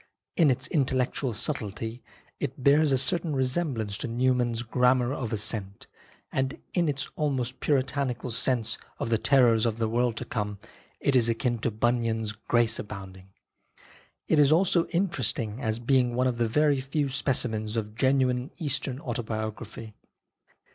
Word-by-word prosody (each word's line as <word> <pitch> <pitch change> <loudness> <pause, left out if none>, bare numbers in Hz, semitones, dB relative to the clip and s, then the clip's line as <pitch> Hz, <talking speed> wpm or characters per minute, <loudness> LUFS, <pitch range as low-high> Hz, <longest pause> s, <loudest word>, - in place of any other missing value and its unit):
In 160 -4 +5
its 130 +1 0
intellectual 130 -4 0
subtlety 110 -1 -2 0.4
it - - -4
bears 145 +2 +5
a 135 - +4
certain 165 +2 +1
resemblance 130 -6 -1
to - - -3
Newman's 120 -1 +1
Grammar 125 +2 +2
of 120 -6 -4
Assent, 105 -2 -1 0.5
and 135 0 -1
in 170 -4 +2
its 140 -1 -2
almost 130 -4 -2
Puritanical 130 -3 0
sense 120 -1 0 0.2
of - - -3
the 115 - +3
terrors 120 -5 +4
of 115 -2 0
the 115 -1 0
world 120 +1 0
to 125 - -4
come, 105 -4 -3 0.4
it 140 - +1
is 120 -2 +4
akin 120 +1 0
to 115 - 0
Bunyan's 115 -1 0
Grace 115 +1 +1
Abounding. 95 -2 -8 1.0
It 155 - +3
is 145 0 +5
also 170 0 +3
interesting 130 - -1
as 110 -3 -1
being 125 0 +2
one 125 +1 +2
of 125 -2 0
the 115 - +2
very 145 +3 +2
few 140 +2 -1
specimens 120 -5 0
of 105 -2 -3
genuine 130 +1 +1
Eastern 140 -5 -2
autobiography. 110 -2 -5
125 Hz, 145 wpm, -27 LUFS, 110-135 Hz, 1.0 s, In